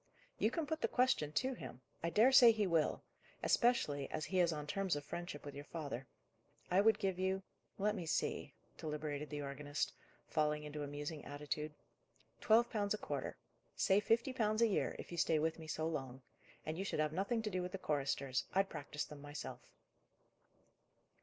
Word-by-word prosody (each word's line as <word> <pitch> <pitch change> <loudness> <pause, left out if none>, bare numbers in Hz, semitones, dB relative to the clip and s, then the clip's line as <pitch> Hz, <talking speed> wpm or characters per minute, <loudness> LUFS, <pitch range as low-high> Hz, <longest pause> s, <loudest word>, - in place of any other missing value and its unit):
"You - - +4
can 330 -3 -2
put 315 +2 -2
the - - +3
question 245 - +2
to 260 +8 +1
him. 130 - -8 0.2
I 170 - 0
dare 225 +9 +6
say 255 -3 +10
he 215 -2 +1
will: 165 -4 +1 0.4
especially 150 - +2
as 155 - -2
he 185 - 0
is 175 -1 +4
on 150 -2 -3
terms 190 +2 0
of 145 -1 -5
friendship 175 -3 -5
with 145 - -6
your 145 - -7
father. 140 -6 -5 0.6
I 185 +2 +6
would 220 0 +5
give 190 -3 -1
you 190 +1 0 0.3
let 210 +1 +2
me 180 -6 -4
see," - - -1 0.2
deliberated 150 -1 -3
the 145 -1 -4
organist, 145 +1 -2 0.3
falling 150 -1 +1
into 150 0 -5
a 145 - -3
musing 145 +2 -5
attitude 150 +1 -4 0.6
"twelve 230 +2 +5
pounds 205 -1 +1
a - - -5
quarter. - - -4 0.4
Say 195 +1 +4
fifty 230 +5 +2
pounds 215 -2 +2
a - - +6
year; 205 - 0
if - - -8
you 170 - -3
stay 160 - +3
with 160 +2 0
me 160 - -8
so 155 +1 -1
long. 135 -5 -4 0.4
And 155 +2 -3
you - - 0
should 195 - -2
have 155 0 +1
nothing 210 +6 0
to 210 - -2
do 185 0 0
with 180 0 -4
the - - -1
choristers: 140 -5 0
I'd 195 0 +3
practise 150 +1 -4
them 150 -2 -10
myself." 145 0 -6
160 Hz, 190 wpm, -37 LUFS, 150-205 Hz, 0.6 s, say